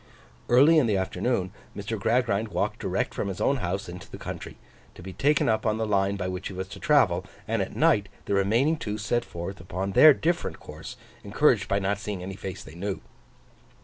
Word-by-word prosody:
Early 145 +7 +6
in 130 - +2
the 105 -3 +2
afternoon, 95 +1 -1 0.3
Mr. 105 +2 -4
Gradgrind 110 -1 +1
walked - - -2
direct - - -1
from - - -2
his 95 -2 -5
own 140 - +2
house 95 -2 -3
into 90 +1 -9
the - - -8
country, - - -7 0.4
to - - -12
be 95 0 -7
taken 145 +7 +2
up 110 -1 +1
on 110 -1 +1
the 110 - -1
line 100 -1 +1
by 90 -2 -3
which 90 0 -4
he 95 - -8
was 95 +1 -4
to - - -9
travel; 130 - +3 0.2
and 115 -1 0
at 95 - -4
night 140 -12 +3 0.2
the - - -1
remaining 115 +11 +2
two 105 -6 -4
set 115 +3 0
forth 85 +1 -7
upon 90 +3 -4
their 150 +8 +8
different 170 +1 -1
course, - - -10 0.3
encouraged - - +2
by 100 - +1
not 100 0 -1
seeing 100 -3 -5
any 95 +1 -6
face 95 -1 -7
they 80 - -12
knew. 95 +3 -4
100 Hz, 210 wpm, -26 LUFS, 95-120 Hz, 0.4 s, their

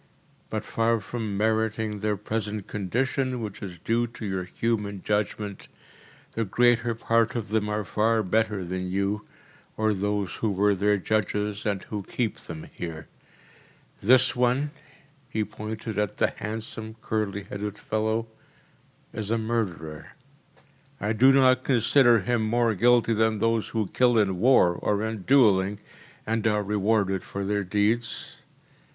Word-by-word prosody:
But - - -3
far 115 0 +1
from 105 0 -4
meriting 110 0 0
their 105 0 0
present 105 0 -3
condition 125 +6 -1
which 105 -4 -6
is 90 -3 -7
due 115 +7 0
to 115 -1 -9
your 95 -2 -2
human 105 0 -2
judgment, 105 -1 -2 0.6
the 115 - -1
greater 120 +2 +2
part 115 +2 +1
of 115 -4 -3
them 105 -1 0
are 105 0 -2
far 110 +3 +1
better 105 -1 0
than 90 +1 -3
you 100 +2 -1 0.5
or 110 0 +2
those 100 -1 -1
who 110 - 0
were 100 +1 +2
their 105 +2 +2
judges 105 +1 -1
and 100 -2 -1
who 105 -2 -5
keep 115 +3 -3
them 80 -1 -8
here. 80 -3 -7 0.9
This 125 +4 +5
one‚ÄĚ 125 +4 +2 0.6
he 110 -4 -1
pointed 105 +1 -6
to 105 -1 -1
the - - +1
handsome, 110 0 -6
curly 100 -2 -2
headed 105 +1 -5
fellow 110 +2 -1 0.9
“is 105 -2 -4
a 115 - +2
murderer. 100 -9 -3 0.9
I 105 +2 0
do 130 +5 +6
not 130 -1 +4
consider 120 -2 +4
him 120 +4 0
more 115 +1 +2
guilty 120 +2 +4
than 110 0 +2
those 115 +1 +1
who 110 -2 -1
kill 125 -2 +3
in 95 -4 +2
war 115 -7 +5
or 100 +4 -1
in 110 -2 -3
duelling, 105 -7 +4 0.5
and 115 0 0
are 105 -1 +1
rewarded 100 -1 +1
for 100 0 -5
their 100 0 0
deeds. 105 +5 -1
110 Hz, 145 wpm, -26 LUFS, 100-115 Hz, 0.9 s, do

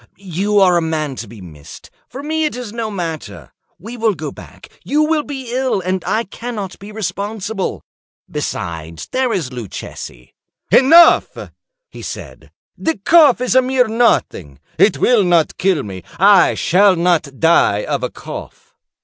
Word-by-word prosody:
You 200 +2 -1
are 180 -3 +4
a - - +1
man 155 -4 -2
to 115 - -6
be 110 -1 -12
missed. 75 -4 -13 0.2
For 270 +3 -8
me 315 +1 -1
it 300 - -2
is 245 -4 -7
no 230 -2 -3
matter. 170 -6 -6 0.3
We 230 +7 -9
will 225 -3 +1
go 155 -2 -6
back; - - -14
you 300 +2 +1
will 310 0 +1
be 265 -4 -7
ill, 260 -4 0
and 185 0 -2
I 225 +2 0
cannot 210 -3 -7
be 200 +2 -10
responsible. 205 0 -4 0.4
Besides, 80 -1 -5
there 255 -1 0
is 160 - -2
Luchesi—" 105 - -9 0.4
"Enough," 325 +5 +5 0.4
he - - -12
said; - - -9 0.3
"the 320 - -2
cough 290 - +5
is 250 - 0
a 260 - +6
mere 255 -1 +1
nothing; 220 - 0 0.2
it 200 - +4
will 240 -5 +3
not 170 -3 +1
kill 185 -6 +1
me. 95 -3 -8
I 195 -1 +5
shall 195 +2 +3
not 165 -5 0
die 160 -11 +3
of - - -2
a - - -2
cough." - - -10
200 Hz, 160 wpm, -17 LUFS, 160-245 Hz, 0.4 s, a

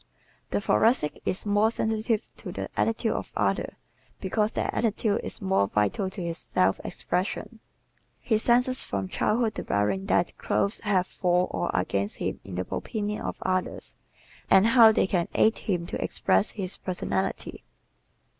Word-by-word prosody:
The - - 0
Thoracic 210 - +2
is 185 - -1
more 205 +1 +3
sensitive 220 0 -1
to - - -6
the - - -5
attitude 225 0 +1
of - - -4
others - - 0 0.4
because 210 +3 0
their - - -1
attitude 220 -2 0
is - - -6
more 190 - +2
vital 105 - 0
to 190 -1 -5
his 170 -1 -3
self 95 -5 +1
expression. 190 +5 -3 0.6
He 220 -3 +1
senses 250 +3 +3
from 95 -2 -3
childhood 225 - +1
the - - -4
bearing 105 - 0
that 170 -3 +1
clothes 200 +2 +1
have 195 -4 +1
for 180 -1 +1
or - - -2
against 100 +2 -1
him - - -3
in 95 - -8
the 90 +1 -2
opinion 210 -1 -3
of - - -4
others 185 -1 -1 0.5
and 190 - +6
how 230 -1 +8
they 215 - +2
can 180 -3 0
aid 220 - +3
him 175 -4 -2
to - - -3
express 95 +2 +2
his 190 -3 -4
personality. 190 +1 -3
195 Hz, 155 wpm, -27 LUFS, 170-220 Hz, 0.6 s, how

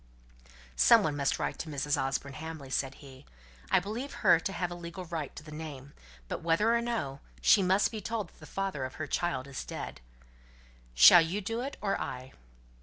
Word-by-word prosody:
"Some 65 - +6
one 150 -2 0
must 140 -1 0
write - - -3
to 160 - -5
Mrs. 145 0 0
Osborne 135 0 -2
Hamley," 150 -2 -7
said 135 0 -1
he. 130 -1 -13 0.5
"I - - +5
believe 235 +8 -5
her 175 -3 +7
to 195 - -3
have 180 -1 -3
a - - -3
legal 175 +1 -7
right 160 -4 -5
to - - -9
the 155 - -11
name; 145 -3 -8 0.3
but - - -4
whether 170 +8 +3
or 235 - +2
no, 220 - -3 0.2
she 205 - +5
must 190 +3 +3
be 220 -2 -5
told 215 -3 -3
that - - -24
the - - -12
father 195 -8 -3
of 130 - -5
her 155 - -4
child 165 -3 -1
is 140 -2 -6
dead. - - -7 0.9
Shall 115 - +10
you 170 +5 -1
do 225 +4 -3
it, 275 +2 -5
or 195 - 0
I?" 130 +1 -6
160 Hz, 200 wpm, -30 LUFS, 140-195 Hz, 0.9 s, Shall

